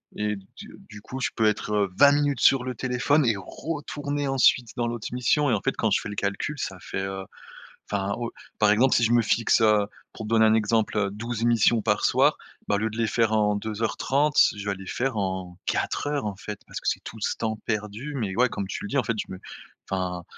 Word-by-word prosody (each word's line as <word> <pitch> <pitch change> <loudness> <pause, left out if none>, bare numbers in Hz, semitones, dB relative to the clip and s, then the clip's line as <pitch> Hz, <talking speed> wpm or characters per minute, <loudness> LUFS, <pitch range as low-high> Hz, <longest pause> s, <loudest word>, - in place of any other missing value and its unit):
et 105 -1 -1
du 95 0 -13
du 105 0 -11
coup, 130 +5 -7
je - - +1
peux 110 - +2
être, 105 0 0
heu, 100 -3 +1
20 140 0 +8
minutes 145 -3 +1
sur 135 -2 +5
le 130 0 -3
téléphone 130 +5 +1
et 115 - +3
retourner 145 - -4
ensuite 130 -3 +3
dans 120 -1 -1
l'autre 120 -2 -4
mission 125 +4 +2
et, - - +3
en 105 - 0
fait, - - -1
quand - - +1
je - - +3
fais - - -6
le 105 - -6
calcul, 100 +10 -2
ça 100 -5 -4
fait, 95 - -4
heu, 95 0 -4 0.7
enfin, 100 0 -1
heu, 120 - -2 0.3
par 105 -1 +4
exemple, 120 +5 +4
si 120 - +3
je 115 - +2
me 120 - +5
fixe, 115 +1 +2
heu, 105 -2 +4 0.3
pour 110 - -7
te - - -6
donner 110 -1 +5
un 110 - +4
exemple, 110 -2 +1
12 115 +2 -4
missions 120 -1 +3
par 105 -1 +1
soir, - - +3 0.3
bah, - - +2
au - - -1
lieu 110 +2 0
de 110 - -8
les 115 - +2
faire 115 0 +1
en 105 -1 +3
2 110 +1 -4
heures 110 - 0
30, 145 +2 +1 0.2
je 105 - -7
vais 100 - 0
les 95 0 -11
faire 130 +4 -2
en 95 -2 -3
4 - - -1
heures, 145 -5 -1
en 100 -2 -4
fait, 105 +1 -7
parce - - -6
que - - -3
c'est - - -1
tout 110 - -8
ce - - 0
temps 110 -1 -2
perdu 110 +6 -3
mais, 105 -7 -2
ouais, 125 +2 +4
comme 100 - -4
tu - - -5
le - - -4
dis, 140 - -3
en - - +3
fait, 115 - -1
je - - -4
me 95 - -7 0.5
enfin, 90 -2 -2
110 Hz, 250 wpm, -25 LUFS, 105-125 Hz, 0.7 s, 20